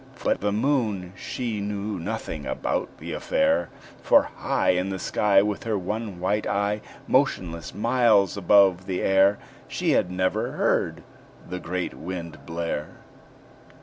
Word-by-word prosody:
But - - +1
the 105 +1 +1
Moon 105 -6 0
she 115 -1 -4
knew 100 -1 -3
nothing 85 -6 -4
about - - -2
the - - -6
affair; 85 -1 +1 0.3
For - - +5
high - - 0
In 90 +1 0
the 95 - -3
sky, 100 +1 +3
With 105 -1 -2
her 110 -2 0
one 105 0 -4
white 100 +4 0
eye, 100 +1 0 0.3
Motionless, 85 -2 0
miles 110 -3 +3
above 95 -1 +4
the 95 -2 -2
air, 95 +1 +4 0.3
She - - 0
had 90 - +2
never 95 0 -1
heard - - 0 0.4
the 90 +1 -5
great 90 +1 -3
Wind 85 -2 -7
blare. 80 -2 -3
95 Hz, 140 wpm, -25 LUFS, 90-105 Hz, 0.4 s, For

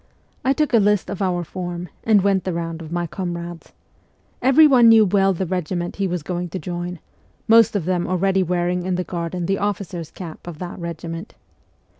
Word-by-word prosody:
I 265 - +3
took 300 -1 0
a 230 - +6
list 205 -2 +2
of 200 - -5
our 180 -2 0
form, 175 0 -5 0.2
and 210 -4 +4
went 195 -2 +2
the 185 - -2
round 165 -1 -4
of 160 -1 -9
my 175 0 -1
comrades. 175 -1 -6 0.7
Everyone 265 -3 +6
knew 225 -1 +7
well 195 0 +3
the 190 +1 -2
regiment 175 0 -3
he 200 -1 0
was 175 -3 -3
going 175 +1 -3
to 190 - -4
join, 175 -1 -5 0.5
most 225 -1 +6
of 190 -6 -1
them 180 -1 0
already 190 +1 +1
wearing 180 0 0
in 185 0 -1
the 180 - -1
garden 170 +1 -4
the 195 +2 0
officer's 195 -5 -3
cap 175 -2 -10
of 170 -3 -7
that 180 +2 -7
regiment. 170 0 -6
180 Hz, 190 wpm, -21 LUFS, 175-195 Hz, 0.7 s, knew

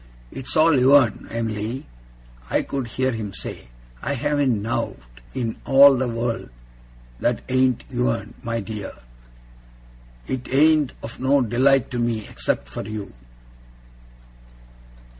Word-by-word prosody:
'It's 135 +5 -5
all 155 -3 +5
yourn, 130 -3 +4
Em'ly,' 115 +2 -3 0.6
I - - +1
could 135 -3 -3
hear 130 +3 0
him 110 -4 -5
say. - - -7 0.3
'I 140 - -2
haven't 140 -4 +1
nowt 115 - -2 0.4
in 120 -4 -2
all 140 0 +7
the 130 0 0
wureld 115 - -2 0.7
that 120 -1 0
ain't 130 -1 +2
yourn, 60 0 -1
my 115 0 -2
dear. 105 -1 -6 1.3
It 125 -1 -4
ain't 150 0 +4
of 115 - -8
no 135 +1 +3
delight 130 +3 +3
to 125 - -2
me, 115 -3 -1
except 65 - -2
for 60 - -5
you! 110 -2 -6
125 Hz, 120 wpm, -23 LUFS, 115-135 Hz, 1.3 s, all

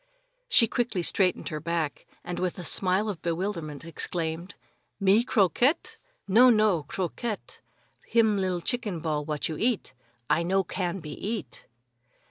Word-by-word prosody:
She 230 - +6
quickly 225 -6 -1
straightened 185 0 +1
her 155 - -4
back, 165 -2 -3 0.2
and 175 0 -4
with 180 -1 -1
a 180 - -5
smile 190 +3 +2
of 200 -6 -4
bewilderment, 170 -3 -3
exclaimed: 165 +1 -3 0.4
"Me 200 +3 +4
croquette? 240 - +2 0.3
No, 235 +6 +7
no; 215 -7 +4
croquette, 205 +4 -4 0.5
him 220 -3 +3
li'l 185 -2 -1
chicken 215 -4 -2
ball 150 -2 -1
what 150 -1 -2
you 155 - -4
eat. 230 - 0 0.3
I 170 - +2
no 190 +3 +2
can 180 +1 -3
be 150 -1 -7
eat!" 200 - -5
185 Hz, 140 wpm, -27 LUFS, 165-215 Hz, 0.5 s, No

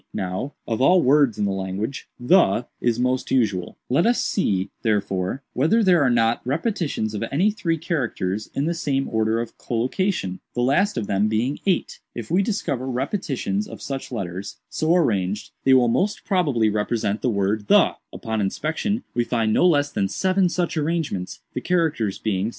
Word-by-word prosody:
Now, 95 +10 -3
of 115 +1 -1
all 180 +6 +5
words 135 -3 +4
in 105 - 0
the 100 - 0
language, 95 +6 -4
'the' 125 - +4
is 120 -2 +1
most 125 +1 0
usual; 105 -8 0
let 145 - +2
us 240 - +3
see, 95 - 0
therefore, 100 +2 -1
whether 180 - +3
there 180 -5 +5
are 135 - +4
not 115 -1 +2
repetitions 150 - -1
of 105 - -3
any 180 +10 +3
three 175 -6 -1
characters, 115 - -2
in 140 - 0
the 170 - 0
same 140 -5 -1
order 110 0 +1
of 115 - -6
collocation, 120 - -1 0.2
the 120 - +1
last 165 +8 +2
of 110 - -1
them 100 +1 +1
being 115 +6 -1
8. 185 - 0 0.2
If 120 +1 -6
we 180 +3 +4
discover 190 - -2
repetitions 130 - -2
of - - -9
such 135 -1 -5
letters, 95 -4 -5
so 160 +2 +2
arranged, 105 - 0
they 135 0 +6
will 125 -2 +5
most 185 - 0
probably 145 - +2
represent 105 0 -1
the 125 - +1
word 100 0 0
'the.' - - +4
Upon 110 -1 -3
inspection, 160 - -1
we 120 - +1
find 115 -3 0
no 180 - +4
less 145 -4 +2
than 95 - 0
seven 185 - +1
such 175 -1 -1
arrangements, 155 - -2
the - - -3
characters 155 - 0
being 100 -3 -1
;48. - - -1
125 Hz, 180 wpm, -23 LUFS, 105-165 Hz, 0.2 s, they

